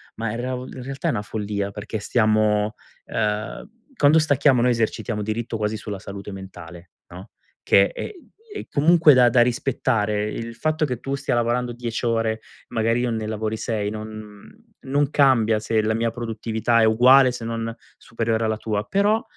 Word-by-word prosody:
Ma 115 -1 -3
in 115 - -4
reav 125 0 -3
in 125 - -8
realtà 135 0 -4
è - - +3
una 105 - -2
follia, 105 -1 -3
perché 105 +1 -5
stiamo 110 -1 +2 0.3
ehm, 105 - -3 0.3
quando 150 -1 +5
stacchiamo 145 -4 +3
noi 125 0 +3
esercitiamo 115 -1 -1
diritto 110 +2 -3
quasi 105 0 -2
sulla 105 -2 -6
salute 100 +1 -8
mentale, 90 -3 -11 0.2
no, 90 +2 -11 0.3
che 100 0 +4
è - - -5 0.4
è 415 - -6
comunque 155 +1 +5
da 125 -2 +6
da 120 +1 +4
rispettare; 110 -4 0
il 115 0 -6
fatto 155 +4 -1
che 125 -5 -1
tu 135 - -4
stia 140 -2 -1
lavorando 120 +1 0
10 120 -1 -4
ore 115 -2 0 0.3
magari 115 +2 0
io 125 -1 0
ne 110 -1 -3
lavori 110 0 -3
6 105 -2 -2
non 110 -1 -8 0.4
non 140 +1 0
cambia 115 -6 +3
se 110 +1 0
la 110 +1 +1
mia 115 +1 0
produttività 115 0 -1
è - - +5
uguale 125 +4 +6
se 115 -2 -7
non 115 0 -3 0.3
superiore 115 -1 -2
alla 110 0 0
tua. 105 -2 -2
Però, 200 +2 +2
uhm, - - -8
115 Hz, 175 wpm, -23 LUFS, 105-125 Hz, 0.4 s, da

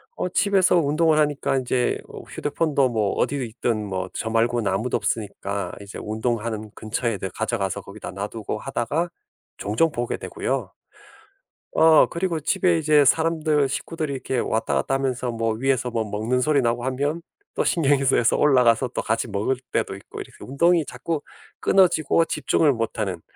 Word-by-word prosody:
어 - - -2
집에서 195 -1 +3
운동을 160 0 +3
하니까 145 -2 +1
인제 125 -1 0
어 - - -9
휴대폰도 145 -3 0
뭐 110 -4 0
어디에 140 -3 -1
있든 110 -1 -2
뭐 95 -1 -3
저 110 - -3
말고는 115 -2 +1
아무도 110 +6 0
없으니까 100 -2 -3
이제 100 0 -9
운동하는 110 0 -2
근처에 115 0 -2
늘 95 - -4
가져가서 100 -4 -2
거기다 100 +2 -9
놔두고 105 +2 -5
하다가 160 +9 -2 0.5
종종 110 +11 +1
보게 120 -3 -2
되고요. - - -3 1.0
어 160 -1 +7
그리고 170 -1 -2
집에 170 +3 +2
이제 150 -2 +4
사람들 155 -1 +2
식구들이 155 +2 -3
이렇게 130 -1 -3
왔다 110 -11 0
갔다 70 - 0
하면서 130 -2 -1
뭐 115 -1 -1
위에서 125 +1 0
뭐 115 -2 -1
먹는 110 +5 -1
소리 145 +2 +2
나고 120 0 0
하면 145 +5 -1 0.3
또 - - +1
신경이 140 -4 +2
쓰여서 120 -3 +3
올라가서 125 -3 +4
또 - - -3
같이 110 +2 -1
먹을 105 +5 0 0.2
때도 - - -1
있고 100 - -9
이렇게 - - -12
운동이 165 +4 +2
자꾸 145 +5 -4 0.4
끊어지고 165 -4 +3
집중을 155 -2 +2
못 115 -1 -3
하는 95 -5 -2
125 Hz, 360 characters per minute, -23 LUFS, 110-150 Hz, 1.0 s, 어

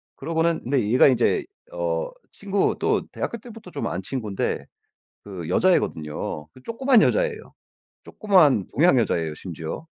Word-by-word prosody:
그러고는 165 0 0
근데 130 0 +1
얘가 125 - +6
이제 230 - +2 0.3
어 - - -2 0.2
친구 200 0 0
또 - - +1
대학교 235 - -4
때부터 220 -5 -12
좀 - - -3
안 90 - -3
친군데 110 -5 -3 0.6
그 90 -5 -7
여자애거든요. 75 - 0
그 130 - -18
조그만 245 0 +3
여자애예요. 475 -3 0 0.5
조그만 165 - +3
동양 155 +1 +5
여자예요 80 -8 -1
심지어. 85 - -7
165 Hz, 320 characters per minute, -24 LUFS, -, 0.6 s, 얘가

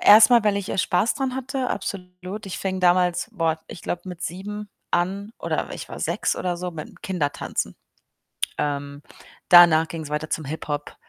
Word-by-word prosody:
erstmal, 215 +2 +8
weil 205 -1 +3
ich, 200 -1 -3
äh, - - -2
Spaß 185 +5 +2
dran 265 -3 -2
hatte, 265 0 -2
absolut. 180 +2 -5
Ich 185 - -5
fing 190 -1 -2
damals, 180 +2 +3
boah, 165 -5 0
ich 170 - -9
glaube, 175 - -3
mit 175 -2 -7
7 205 +4 -5 0.2
an 195 +4 -1
oder - - -2
ich - - -7
war - - -7
6 - - 0
oder 180 -1 -1
so 180 +1 -4
mit'm 155 -2 -8
Kindertanzen. 165 -7 -2 0.8
Ähm, 145 -1 -2 0.5
danach 170 -2 +8
ging's 160 -2 -6
weiter 150 +1 -2
zum 155 - -2
Hip-Hop. 145 0 -4
180 Hz, 170 wpm, -24 LUFS, 160-205 Hz, 0.8 s, erstmal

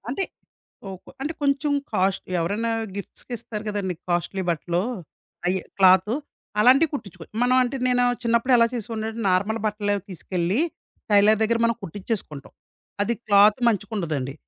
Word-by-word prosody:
అంటే 280 +10 -1 0.6
ఓ - - -5 0.2
కొ - - -12
అంటే 300 - -2
కొంచెం 285 +1 +1 0.2
కాస్ట్‌ 195 -1 +1 0.2
ఎవరైనా 205 +7 -1 0.3
గిఫ్ట్స్‌కిస్తారు 215 +1 -7
గదండీ! 200 -3 -2
కాస్ట్‌లీ 175 +2 -1
బట్టలు, 170 +1 -1 0.7
అయి 185 +1 +2 0.2
క్లాతు 190 +3 +5 0.5
అలాంటివి 270 +7 +5
కుట్టిచ్చుకో 185 - -7 0.2
మనం 250 +1 +3
అంటే 250 +2 -2
నేను, 245 0 +3 0.2
చిన్నప్పుడు 235 +2 +2
ఎలా 230 -1 +5
చేసేవన్నానంటే 225 0 -4
నార్మల్ 200 +5 +1
బట్టలు 205 -1 0 0.2
తీసుకెళ్లి, 180 - -1 0.5
టైలర్ 205 +1 +5
దగ్గర 230 +1 +2
మనం 230 0 +2
కుట్టిచ్చేసుకుంటాం. 190 - -5 0.5
అది 230 +4 0
క్లాత్ 205 +1 +6
మంచిగుండదండి. 170 - -2
210 Hz, 130 wpm, -24 LUFS, 185-235 Hz, 0.7 s, క్లాత్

